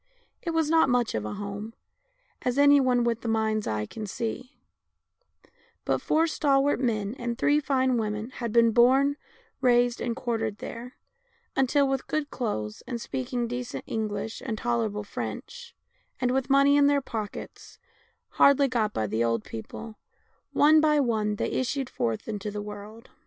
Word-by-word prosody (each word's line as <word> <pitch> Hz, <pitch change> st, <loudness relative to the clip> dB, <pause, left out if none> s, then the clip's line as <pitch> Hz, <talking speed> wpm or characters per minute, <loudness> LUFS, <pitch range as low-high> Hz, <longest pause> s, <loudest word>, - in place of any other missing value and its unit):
It 345 Hz, -, -4 dB
was 325 Hz, -2 st, +1 dB
not 320 Hz, -2 st, +4 dB
much 245 Hz, -2 st, +1 dB
of 105 Hz, -1 st, -2 dB
a 105 Hz, -, -4 dB
home, 205 Hz, +2 st, -6 dB, 0.7 s
as 250 Hz, +1 st, -1 dB
any 285 Hz, 0 st, +7 dB
one 250 Hz, -2 st, +2 dB
with 235 Hz, -1 st, 0 dB
the -, -, -5 dB
mind's 220 Hz, -1 st, 0 dB
eye 105 Hz, 0 st, -1 dB
can 215 Hz, -, -7 dB
see, 240 Hz, +5 st, -5 dB, 1.3 s
but -, -, 0 dB
four 320 Hz, +1 st, +2 dB
stalwart 285 Hz, -3 st, +2 dB
men 215 Hz, -5 st, -1 dB
and 235 Hz, -1 st, -3 dB
three 295 Hz, +1 st, +3 dB
fine 260 Hz, -3 st, +1 dB
women 215 Hz, +1 st, -3 dB
had 235 Hz, -3 st, -4 dB
been 230 Hz, 0 st, +5 dB
born, 260 Hz, +5 st, +4 dB, 0.5 s
raised, 245 Hz, -1 st, +3 dB
and 235 Hz, -1 st, -2 dB
quartered 225 Hz, -4 st, -2 dB
there, 240 Hz, +3 st, -8 dB, 0.6 s
until, 275 Hz, +1 st, +3 dB
with 270 Hz, -1 st, -2 dB
good 305 Hz, -1 st, -2 dB
clothes, 110 Hz, -, -3 dB
and 240 Hz, -2 st, -3 dB
speaking 245 Hz, 0 st, -3 dB
decent 245 Hz, +1 st, -5 dB
English 220 Hz, 0 st, -3 dB
and 230 Hz, -5 st, -3 dB
tolerable 225 Hz, -3 st, -1 dB
French, 480 Hz, -, -7 dB, 0.4 s
and 250 Hz, -1 st, +1 dB
with 265 Hz, +1 st, 0 dB
money 275 Hz, +1 st, +5 dB
in 285 Hz, -1 st, +5 dB
their 285 Hz, -1 st, +3 dB
pockets, 220 Hz, -5 st, -7 dB, 0.5 s
hardly 280 Hz, 0 st, +5 dB
got 225 Hz, -5 st, 0 dB
by 110 Hz, -, -1 dB
the 110 Hz, +3 st, 0 dB
old 115 Hz, -2 st, 0 dB
people, 215 Hz, -, -8 dB, 0.5 s
one 310 Hz, +1 st, +5 dB
by 300 Hz, -1 st, +3 dB
one 220 Hz, -5 st, +1 dB
they -, -, -2 dB
issued 260 Hz, +1 st, -2 dB
forth 115 Hz, -1 st, -2 dB
into 210 Hz, -1 st, -4 dB
the 210 Hz, 0 st, -5 dB
world. 210 Hz, +3 st, -10 dB
240 Hz, 160 wpm, -27 LUFS, 215-270 Hz, 1.3 s, any